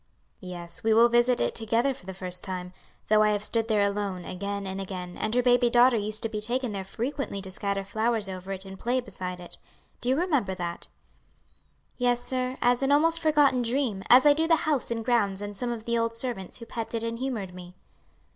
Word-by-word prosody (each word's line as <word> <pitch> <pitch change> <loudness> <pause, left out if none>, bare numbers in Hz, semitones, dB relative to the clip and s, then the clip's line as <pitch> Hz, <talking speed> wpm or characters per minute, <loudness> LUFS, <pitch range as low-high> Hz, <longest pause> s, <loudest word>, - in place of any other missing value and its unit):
"Yes, 175 -2 -7
we 220 0 +3
will 235 +1 +7
visit 240 +1 +3
it - - 0
together 230 +4 +1
for 190 - -16
the 190 - -5
first 180 -1 -3
time; 180 -1 -5 0.3
though 215 0 +5
I 215 - +4
have 205 0 -1
stood 225 +1 0
there 215 -3 +3
alone 200 -3 -2
again 200 +2 -4
and 190 0 -4
again, 180 -2 -6
and 215 +2 -2
her 250 - +3
baby 245 -1 +4
daughter 245 +1 +5
used 215 0 -2
to - - +1
be 215 -1 -4
taken 245 +2 -1
there 195 -2 -4
frequently 240 +3 -4
to 190 - -5
scatter 200 0 -2
flowers 220 +1 0
over 190 0 -6
it 190 0 -4
and 190 0 -10
play 245 +2 0
beside 185 -7 -6
it. 175 - -6 0.4
Do 245 - -1
you 260 - +4
remember 290 - 0
that?" 175 -2 -5 1.1
"Yes, 245 0 +2
sir, 255 0 -2
as 245 +1 +3
an 270 +1 +2
almost 325 +3 +4
forgotten 295 -5 +3
dream, 235 -4 0
as 255 +4 +8
I 295 - +8
do 320 +2 +1
the 330 - +6
house 300 -4 +1
and 230 -1 -3
grounds 205 -6 +2
and 205 0 -6
some 240 +4 -2
of 225 -2 -5
the 235 0 +1
old 230 0 -1
servants 230 -6 -4
who 230 - -9
petted 230 0 -4
and 230 0 -3
humored 230 -8 -3
me." 180 0 -11
225 Hz, 220 wpm, -27 LUFS, 195-245 Hz, 1.1 s, as